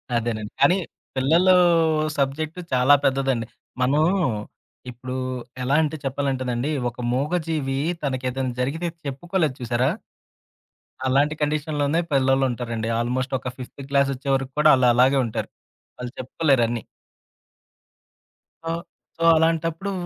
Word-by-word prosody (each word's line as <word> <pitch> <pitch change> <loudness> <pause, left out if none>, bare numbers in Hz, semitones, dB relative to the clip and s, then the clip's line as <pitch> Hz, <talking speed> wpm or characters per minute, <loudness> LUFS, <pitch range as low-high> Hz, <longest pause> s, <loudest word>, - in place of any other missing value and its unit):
అదేనండి. 110 -2 -2
కానీ 180 - +5 0.4
పిల్లలు 165 +8 +4 0.6
సబ్జెక్ట్ 150 +5 -1
చాలా 130 +3 +6
పెద్దదండి. 135 -3 +1 0.4
మనం, 140 +5 +3 0.9
ఇప్పుడు 125 +1 -7 0.5
ఎలా 135 +3 +1
అంటే 155 0 -2
చెప్పాలంటేనండి, 130 -1 -1 0.2
ఒక 120 - -17 0.2
మూగజీవి 150 -1 -1 0.3
తనకేదైనా 130 -1 -2
జరిగితే 160 +7 -2 0.2
చెప్పుకోలేదు 155 +1 -1
చూసారా? 120 +2 +1 1.2
అలాంటి 140 +4 +2
కండిషన్‌లోనే 150 +1 0
పిల్లలుంటారండి. 125 -4 +1
ఆల్మోస్ట్ 130 +3 -1
ఒక 130 - -4
ఫిఫ్తు 130 +2 -9
క్లాసొచ్చే 140 -1 +1
వరకు 135 0 -2
కూడా 155 0 +6
ఆళ్ళు 130 -1 +3
అలాగే 130 +3 +4
ఉంటారు. 110 - -4 0.5
వాళ్ళు 125 -1 -6
చెప్పుకోలేరన్నీ. 125 -4 +1 1.8
ఆ! 165 - -3 0.5
సో, 165 - -3
అలాంటప్పుడు 165 +4 0
135 Hz, 100 wpm, -23 LUFS, 125-150 Hz, 1.8 s, చాలా